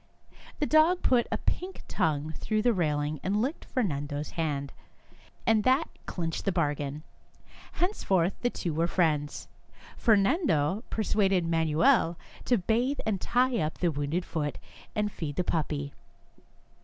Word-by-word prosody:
The 300 Hz, -, 0 dB
dog 315 Hz, +4 st, +4 dB
put 245 Hz, -2 st, +3 dB
a -, -, +1 dB
pink 370 Hz, +1 st, -3 dB
tongue 155 Hz, 0 st, 0 dB
through 215 Hz, +5 st, -1 dB
the 240 Hz, -1 st, +4 dB
railing 150 Hz, -4 st, 0 dB
and 200 Hz, +3 st, 0 dB
licked 265 Hz, +8 st, -2 dB
Fernan 155 Hz, -, -1 dB
do's 145 Hz, +1 st, -4 dB
hand, 145 Hz, -4 st, -2 dB, 0.7 s
and 220 Hz, -1 st, +3 dB
that 260 Hz, +7 st, +3 dB, 0.2 s
clinched 165 Hz, -3 st, -3 dB
the 195 Hz, -, +2 dB
bargain. 150 Hz, -3 st, -1 dB, 0.7 s
Henceforth 195 Hz, -, +1 dB
the 245 Hz, -, +2 dB
two 175 Hz, -8 st, -3 dB
were 165 Hz, +2 st, +1 dB
friends. 155 Hz, -5 st, 0 dB, 0.5 s
Fernando 205 Hz, -, +2 dB
persuaded 195 Hz, -4 st, +1 dB
Manuel 165 Hz, -, +3 dB, 0.3 s
to 245 Hz, -, +3 dB
bathe 235 Hz, +8 st, 0 dB
and 200 Hz, -4 st, -1 dB
tie 250 Hz, -1 st, +2 dB
up 155 Hz, -1 st, -2 dB
the 175 Hz, -2 st, +1 dB
wounded 145 Hz, +5 st, -2 dB
foot, 150 Hz, -3 st, -3 dB, 0.4 s
and 210 Hz, 0 st, 0 dB
feed 150 Hz, -6 st, -5 dB
the 180 Hz, -, 0 dB
puppy. 150 Hz, -4 st, -2 dB
180 Hz, 140 wpm, -28 LUFS, 150-230 Hz, 0.7 s, dog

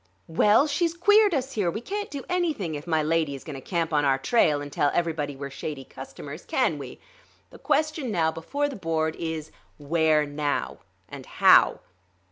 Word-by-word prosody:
"Well, 210 Hz, -, +4 dB
she's 330 Hz, +3 st, 0 dB
queered 410 Hz, +1 st, +4 dB
us 265 Hz, 0 st, -2 dB
here. 200 Hz, -5 st, 0 dB
We 190 Hz, -, -3 dB
can't 410 Hz, -, -5 dB
do 280 Hz, -2 st, -6 dB
anything 325 Hz, -, -1 dB
if 150 Hz, +2 st, -7 dB
my 160 Hz, -2 st, +1 dB
lady 155 Hz, -2 st, 0 dB
is 135 Hz, -, -10 dB
going 155 Hz, -, -7 dB
to 135 Hz, -, -8 dB
camp 165 Hz, +1 st, -2 dB
on 145 Hz, -1 st, +3 dB
our 135 Hz, -1 st, +3 dB
trail 150 Hz, -, +2 dB
and 145 Hz, 0 st, -8 dB
tell 145 Hz, -, +2 dB
everybody 160 Hz, -4 st, -1 dB
we're 140 Hz, 0 st, -7 dB
shady 140 Hz, 0 st, -6 dB
customers, 140 Hz, +4 st, -10 dB
can 215 Hz, -, 0 dB
we? 140 Hz, -, -9 dB, 0.5 s
The -, -, -14 dB
question 310 Hz, -4 st, 0 dB
now 165 Hz, -6 st, +1 dB
before 280 Hz, -, -2 dB
the 280 Hz, -, -6 dB
board 160 Hz, -3 st, -1 dB
is: 160 Hz, -2 st, -5 dB, 0.3 s
Where 155 Hz, 0 st, +2 dB
now, 145 Hz, 0 st, -3 dB, 0.3 s
and -, -, -10 dB
how?" -, -, +5 dB
165 Hz, 185 wpm, -25 LUFS, -, 0.5 s, how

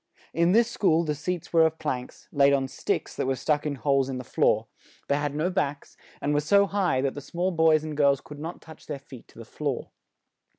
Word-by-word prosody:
In 170 Hz, +2 st, +3 dB
this 230 Hz, +3 st, +5 dB
school 170 Hz, -8 st, +2 dB
the 155 Hz, -2 st, -1 dB
seats 170 Hz, +4 st, -4 dB
were 165 Hz, -1 st, +6 dB
of 160 Hz, 0 st, +1 dB
planks, 125 Hz, -4 st, -5 dB
laid 140 Hz, -1 st, +4 dB
on 135 Hz, -1 st, +1 dB
sticks -, -, -3 dB
that -, -, -2 dB
were 135 Hz, -, +1 dB
stuck 150 Hz, +3 st, 0 dB
in 145 Hz, -, -2 dB
holes 135 Hz, -1 st, +1 dB
in 130 Hz, -, -3 dB
the 130 Hz, -, -5 dB
floor; -, -, +1 dB, 0.4 s
they 140 Hz, -, +2 dB
had 145 Hz, -1 st, -2 dB
no 165 Hz, +5 st, 0 dB
backs; 145 Hz, -4 st, -2 dB, 0.3 s
and 145 Hz, +1 st, 0 dB
were 145 Hz, -, +3 dB
so 200 Hz, +7 st, +4 dB
high 190 Hz, -10 st, 0 dB
that 135 Hz, -1 st, 0 dB
the 145 Hz, -, -7 dB
small 175 Hz, +6 st, -2 dB
boys 160 Hz, -2 st, +4 dB
and 155 Hz, -1 st, -5 dB
girls 140 Hz, -2 st, +3 dB
could 145 Hz, +1 st, -11 dB
not 165 Hz, +3 st, -6 dB
touch 160 Hz, -1 st, -14 dB
their 150 Hz, -, -4 dB
feet 135 Hz, -3 st, -13 dB
to -, -, -21 dB
the 115 Hz, -, -9 dB
floor. 140 Hz, +2 st, -4 dB
150 Hz, 230 wpm, -26 LUFS, 140-165 Hz, 0.4 s, were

